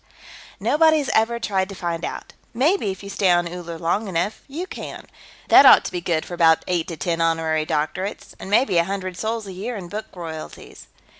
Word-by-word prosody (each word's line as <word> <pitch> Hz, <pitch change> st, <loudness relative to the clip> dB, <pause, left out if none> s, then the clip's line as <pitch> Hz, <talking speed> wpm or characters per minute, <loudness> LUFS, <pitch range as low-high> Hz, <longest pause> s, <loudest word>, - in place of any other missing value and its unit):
"Nobody's 310 Hz, -2 st, +3 dB
ever 230 Hz, +2 st, +2 dB
tried 195 Hz, -4 st, -1 dB
to 195 Hz, -, -8 dB
find 170 Hz, -2 st, -3 dB
out. -, -, -6 dB, 0.2 s
Maybe 285 Hz, -, +2 dB
if 190 Hz, +1 st, -6 dB
you 200 Hz, -, -8 dB
stay 195 Hz, -1 st, +1 dB
on 175 Hz, -1 st, +3 dB
Uller 170 Hz, -1 st, -7 dB
long 185 Hz, +7 st, -1 dB
enough, 185 Hz, +3 st, -2 dB
you 310 Hz, +6 st, -5 dB
can. -, -, -8 dB, 0.4 s
That -, -, +9 dB
ought -, -, +8 dB
to -, -, -3 dB
be 180 Hz, -1 st, -3 dB
good 165 Hz, -2 st, -1 dB
for -, -, -9 dB
about 165 Hz, -2 st, +4 dB
eight 175 Hz, -3 st, -1 dB
to 165 Hz, -, -6 dB
ten 165 Hz, +3 st, -1 dB
honorary 160 Hz, -1 st, 0 dB
doctorates. 160 Hz, +6 st, -3 dB
And -, -, -8 dB
maybe 205 Hz, -4 st, +3 dB
a -, -, +4 dB
hundred 190 Hz, -1 st, -4 dB
sols 220 Hz, +3 st, -3 dB
a 195 Hz, -, -8 dB
year 215 Hz, +7 st, -5 dB
in 185 Hz, -4 st, -7 dB
book 215 Hz, +3 st, -5 dB
royalties." 160 Hz, -3 st, -9 dB
185 Hz, 205 wpm, -22 LUFS, 170-215 Hz, 0.4 s, That